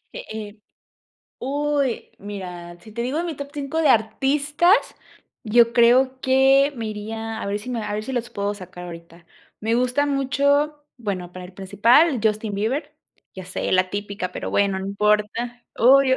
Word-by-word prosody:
Eh - - -7
eh 215 -1 -7 0.8
Uy, 285 -1 -1
mira, 180 -4 -8
si 215 +4 -15
te 235 +2 -3
digo 260 +6 -1
de 340 - -1
mi 335 -2 -3
top 280 0 -7
5 290 +2 -2
de 305 - +4
artistas, 280 +8 +2 0.7
yo 235 +1 +4
creo 255 +3 +4
que 270 +2 +4
me 230 -2 -4
iría, 220 +1 -5
a - - -3
ver 200 +1 -1
si 215 +5 -8
me 235 -3 -2
a 210 -1 -4
ver 210 +1 -3
si 265 - -5
los 240 -1 -2
puedo 205 -2 -2
sacar 185 -2 -10
ahorita. 170 0 -11 0.3
Me 225 +2 0
gustan 255 +4 +1
mucho, 285 +2 +1
bueno, 190 -7 -4
para 185 0 -8
el 180 - -11
principal, 230 - +3
Justin 215 -1 0
Bieber, 270 +9 -2 0.4
ya 190 - -8
sé, 185 - -3
la 185 0 +3
típica, 200 -2 -4
pero - - -5
bueno, 200 -1 +2
no 190 - -5
importa. 210 +4 0
Obvio, 260 +2 +6
230 Hz, 175 wpm, -23 LUFS, 200-270 Hz, 0.8 s, Obvio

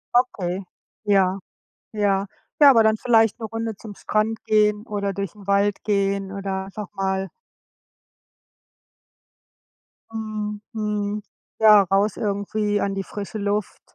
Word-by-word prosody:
Okay. 195 -7 +1 0.4
Ja, 195 -2 +2 0.5
ja. 200 -2 +1 0.4
Ja, 285 - +10
aber 230 -4 +6
dann 220 0 +4
vielleicht 225 -3 +3
'ne 225 - -4
Runde 225 -1 -4
zum 205 0 -10
Strand 215 +1 -1
gehen 210 0 +2
oder 200 -2 -2
durch 200 -2 -4
'n 205 -2 -14
Wald 200 0 +1
gehen 195 -1 0
oder 195 -1 -3
einfach 200 +1 -7
mal 190 0 -1 2.8
Mhm, 215 -1 -4
mhm. 210 -1 -2 0.4
Ja, 215 -2 +8
raus 195 +2 +1
irgendwie 205 0 -1
an 200 0 -1
die 195 - -2
frische 205 +2 -6
Luft, 205 0 -2
205 Hz, 125 wpm, -23 LUFS, 195-215 Hz, 2.8 s, Ja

